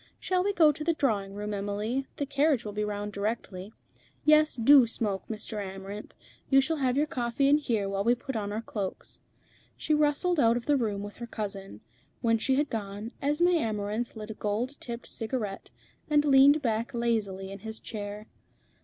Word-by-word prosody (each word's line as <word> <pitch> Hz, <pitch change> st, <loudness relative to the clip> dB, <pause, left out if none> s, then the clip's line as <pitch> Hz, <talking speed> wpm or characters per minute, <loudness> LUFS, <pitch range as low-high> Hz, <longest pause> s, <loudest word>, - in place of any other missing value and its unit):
Shall 365 Hz, -1 st, 0 dB
we 405 Hz, -, +1 dB
go 325 Hz, -6 st, +5 dB
into 300 Hz, +1 st, -2 dB
the 335 Hz, +1 st, +1 dB
drawing 200 Hz, -9 st, 0 dB
room, 210 Hz, +1 st, -4 dB
Emily? 210 Hz, +6 st, -2 dB
the 285 Hz, -, -1 dB
carriage 280 Hz, -3 st, +1 dB
will 210 Hz, -, -4 dB
be 210 Hz, +1 st, -1 dB
round 205 Hz, 0 st, -4 dB
directly. 200 Hz, -2 st, -4 dB, 0.5 s
Yes; 305 Hz, 0 st, +5 dB
do 255 Hz, +1 st, +7 dB
smoke, 210 Hz, -4 st, -2 dB
Mr. 215 Hz, -1 st, -4 dB
Amarinth. 195 Hz, +2 st, -8 dB, 0.4 s
You 270 Hz, -, +6 dB
shall 310 Hz, +4 st, +1 dB
have 260 Hz, -2 st, +1 dB
your 295 Hz, -, +3 dB
coffee 250 Hz, -1 st, 0 dB
in 290 Hz, +2 st, +5 dB
here 225 Hz, -8 st, -1 dB
while 195 Hz, 0 st, -1 dB
we 240 Hz, +3 st, +4 dB
put 265 Hz, +2 st, -6 dB
on 205 Hz, -2 st, -2 dB
our 220 Hz, +2 st, -3 dB
cloaks." 200 Hz, -4 st, -5 dB, 0.6 s
She 310 Hz, -, 0 dB
rustled 300 Hz, +3 st, +2 dB
out 230 Hz, -2 st, +4 dB
of 240 Hz, -, -5 dB
the 295 Hz, -, +3 dB
room 210 Hz, -6 st, -1 dB
with 205 Hz, 0 st, -8 dB
her 235 Hz, -, -6 dB
cousin. 195 Hz, -, -6 dB, 0.4 s
When 230 Hz, -1 st, +2 dB
she 265 Hz, +3 st, +2 dB
had 290 Hz, +1 st, 0 dB
gone, 210 Hz, 0 st, -4 dB
Esmé 340 Hz, +5 st, +3 dB
Amarinth 215 Hz, +2 st, -2 dB
lit 215 Hz, 0 st, -7 dB
a -, -, -5 dB
gold 215 Hz, +6 st, -2 dB
tipped 235 Hz, 0 st, -7 dB
cigarette, 220 Hz, -4 st, -4 dB, 0.4 s
and 295 Hz, -1 st, +4 dB
leaned 285 Hz, +1 st, +6 dB
back 230 Hz, 0 st, -1 dB
lazily 205 Hz, -5 st, -1 dB
in 195 Hz, -, -8 dB
his 220 Hz, +2 st, -6 dB
chair. 210 Hz, -1 st, -6 dB
230 Hz, 190 wpm, -28 LUFS, 205-275 Hz, 0.6 s, do